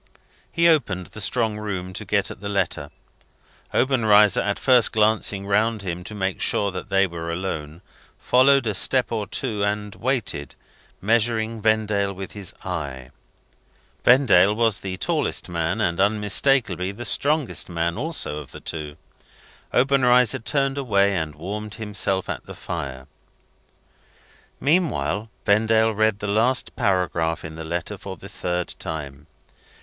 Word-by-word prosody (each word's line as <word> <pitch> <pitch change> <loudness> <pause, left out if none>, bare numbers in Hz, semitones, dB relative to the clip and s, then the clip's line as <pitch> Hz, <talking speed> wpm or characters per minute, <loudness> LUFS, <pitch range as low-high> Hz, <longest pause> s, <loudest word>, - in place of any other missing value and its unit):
He 170 -1 +3
opened 110 - +2
the 110 - -6
strong 110 0 0
room 95 -3 -4
to 100 - -5
get 100 0 0
at - - -11
the 100 - -4
letter. 90 -7 -1 0.8
Obenreizer, 110 -6 +4
after 100 0 -1
first 125 -4 +4
glancing 105 -2 +2
round 110 +1 +1
him 90 -1 -4
to 105 - -7
make 95 -2 -2
sure 100 -1 +1
that 90 -1 -7
they 95 0 +3
were 85 -2 -5
alone, 85 -2 -5 0.3
followed 135 +1 +4
a 110 - 0
step 125 +5 +2
or 110 -3 -2
two 110 -6 -2
and 105 0 -2
waited, 115 - -2 0.5
measuring 110 +1 +1
Vendale 105 -2 +1
with 95 0 -7
his 100 -3 -6
eye. 70 -8 -5 0.9
Vendale 105 -6 +5
was 115 -2 +2
the 95 -1 -5
tallest 95 - -1
man, 85 +4 -1
and 85 -5 0
unmistakably 105 -1 +2
the 120 +5 -8
strongest 150 -6 0
man 85 0 -1
also 145 - -2
of 75 - -10
the - - -10
two. 75 -2 -6 0.7
Obenreizer 125 -1 +3
turned 135 +3 0
away, 100 -6 +2
and 80 -4 -3
warmed 105 +6 -6
himself 105 -3 -1
at - - -4
the - - -9
fire. 65 -1 -6 1.5
Meanwhile, 120 - 0 0.2
Vendale 110 +1 +3
read 110 -1 +2
the 105 - -6
last 115 +5 +1
paragraph 85 -4 0
in 80 - -7
the 80 0 -7
letter 85 +5 -4
for 95 -1 -8
the 100 - -11
third 90 -2 -3
time. 75 -4 -6
100 Hz, 145 wpm, -23 LUFS, 90-115 Hz, 1.5 s, Vendale